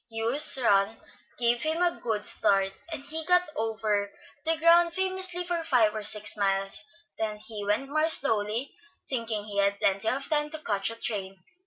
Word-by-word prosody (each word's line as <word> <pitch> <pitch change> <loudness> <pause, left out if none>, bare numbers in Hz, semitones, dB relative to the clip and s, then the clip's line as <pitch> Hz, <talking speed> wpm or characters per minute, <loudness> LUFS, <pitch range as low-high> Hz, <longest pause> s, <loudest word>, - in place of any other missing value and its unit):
Hugh's 235 +7 +4
run 215 -3 +1 0.4
gave 235 0 +1
him 315 +2 -2
a 350 -1 0
good 215 -3 -3
start, 195 -2 +4 0.2
and 305 -4 -5
he 320 +3 -3
got 360 0 +3
over 215 -4 -2 0.3
the 325 0 +1
ground 335 +1 +4
famously 375 -1 +1
for 345 -1 -3
five 235 -8 +2
or 215 - -4
six 210 0 +2
miles; 195 +3 -1 0.4
then 215 -1 -3
he 210 -1 -7
went 210 +7 -1
more 310 +3 0
slowly, 225 -3 +1 0.3
thinking 230 -5 -3
he 205 -1 -4
had 200 0 +1
plenty 195 +3 +1
of 275 +1 -3
time 300 -1 0
to 315 - -6
catch 200 -1 0
a 230 - -5
certain 230 - -19
train. 195 -3 -5
225 Hz, 180 wpm, -26 LUFS, 205-310 Hz, 0.4 s, Hugh's